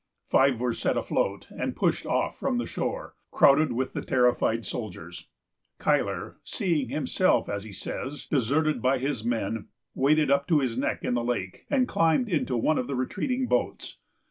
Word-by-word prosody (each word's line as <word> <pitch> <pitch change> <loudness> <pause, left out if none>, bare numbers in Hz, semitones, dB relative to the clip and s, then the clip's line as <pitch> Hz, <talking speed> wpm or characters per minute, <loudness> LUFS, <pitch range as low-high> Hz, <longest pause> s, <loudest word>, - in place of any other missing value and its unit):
Five 135 -3 +4
were 125 -1 0
set - - 0
afloat, - - -1
and - - -3
pushed - - 0
off - - -1
from 260 -3 0
the 245 - -1
shore, - - -4 0.2
crowded 150 +3 +5
with 130 +2 -2
the - - -3
terrified 125 -3 +2
soldiers. 90 -6 -6 0.5
Cuyler, - - 0
seeing 165 -7 -1
himself, 155 -4 +1
as 100 0 -4
he 110 - -9
says, 135 +8 -5
deserted 150 +4 +1
by 130 +1 +3
his 130 -3 -2
men, 115 -2 -2 0.3
waded 150 +1 +3
up 140 0 +2
to 160 - +4
his 130 -5 0
neck 130 +3 -1
in - - 0
the 120 -1 0
lake, 115 -6 -3
and 260 -3 +2
climbed 165 +7 +2
into 145 -8 0
one 155 +7 +2
of 125 - -2
the 140 - -3
retreating 250 - -1
boats. - - -2
130 Hz, 170 wpm, -27 LUFS, 120-155 Hz, 0.5 s, crowded